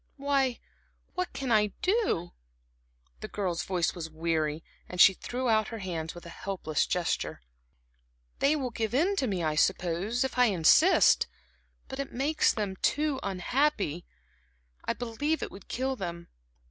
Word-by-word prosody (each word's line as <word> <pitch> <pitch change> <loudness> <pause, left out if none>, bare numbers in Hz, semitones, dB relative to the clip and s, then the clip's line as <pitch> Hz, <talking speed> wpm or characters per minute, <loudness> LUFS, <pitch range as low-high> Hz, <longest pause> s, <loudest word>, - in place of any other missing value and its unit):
"Why, 275 -3 +1 0.6
what 365 0 -2
can 265 -3 -3
I 210 -1 +5 0.2
do?" 370 - +1 0.9
The 215 - -6
girl's 185 -5 -2
voice 180 -3 0
was 165 -2 -6
weary, 160 -1 -1 0.3
and 180 - -7
she 190 - +9
threw 250 +6 -4
out 220 -2 +3
her 230 - -6
hands 170 -5 -4
with 175 - -11
a - - -8
helpless 170 -4 -2
gesture. 180 -2 -1 1.0
"They 285 +2 +3
will 260 -5 -2
give 225 0 -2
in 360 +9 +3
to 265 - +1
me, 190 -5 -1
I 155 -1 +1
suppose, 185 - +1
if 265 -1 -3
I 250 - +7
insist; 205 - +5 0.6
but 265 - -7
it 275 - -3
makes 290 +5 +2
them 200 -3 -3
too 295 +3 +1
unhappy. 195 - 0 0.8
I - - 0
believe 245 +7 -2
it - - -5
would 195 - -12
kill 265 +2 -1
them. 170 -5 -6
215 Hz, 155 wpm, -29 LUFS, 175-265 Hz, 1.0 s, she